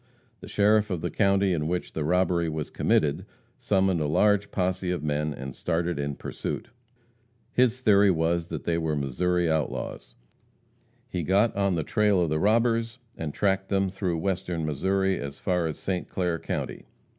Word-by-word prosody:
The - - -10
sheriff 105 +1 +3
of 90 -5 -2
the 85 - -2
county 100 -2 +2
in 75 -2 -1
which 90 +1 -3
the 80 - -2
robbery 85 0 +1
was 80 -1 -4
committed 75 -2 +1 0.4
summoned 95 -4 +1
a 75 - 0
large 105 +6 +3
posse 90 0 -1
of 90 -3 -2
men 75 0 -1
and 70 -2 -7
started 85 -2 -1
in 70 0 -2
pursuit. - - -5 0.8
His 125 0 +2
theory 100 -4 +5
was 85 -1 +1
that - - -5
they 85 -1 0
were 80 -2 -1
Missouri 85 +6 0
outlaws. 80 -2 -3 0.9
He 90 - -3
got 100 +7 +2
on 100 -2 +1
the 80 - -1
trail 105 +1 +2
of 85 -3 +1
the 75 - +1
robbers, 115 +3 +2 0.2
and 80 -2 -4
tracked 95 +3 0
them 95 -1 +1
through 95 -3 -2
western 85 -2 -2
Missouri 95 +6 0
as 70 0 -6
far 90 -3 0
as 80 - -4
St. 90 -2 -3
Clair 90 -3 -1
county. - - -4
90 Hz, 170 wpm, -26 LUFS, 80-100 Hz, 0.9 s, theory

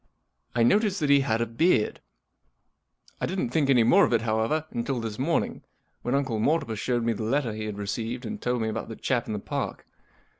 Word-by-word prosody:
I 120 - +3
noticed 205 - +3
that 145 -2 +2
he 140 - +7
had 115 -4 0
a - - +2
beard. 115 +1 +1 1.2
I - - -1
didn't 180 -10 -2
think 145 -1 +1
any 125 -4 +5
more 185 - +6
of - - +2
it, 115 -1 +2
however, 115 +8 0
until 120 +2 -2
this 115 -1 -5
morning, 165 +5 0 0.4
when 125 - -1
Uncle 130 -6 0
Mortimer 115 -2 +1
showed 120 +2 -1
me 115 0 +1
the 110 - -6
letter 120 +1 0
he 110 0 -4
had 105 -1 -5
received 115 +5 -3
and 215 -1 -5
told 125 -2 0
me - - -1
about 110 +1 -4
the 115 - -6
chap 120 0 -1
in 110 - -3
the - - -2
Park. 100 - -4
120 Hz, 215 wpm, -26 LUFS, 110-140 Hz, 1.2 s, he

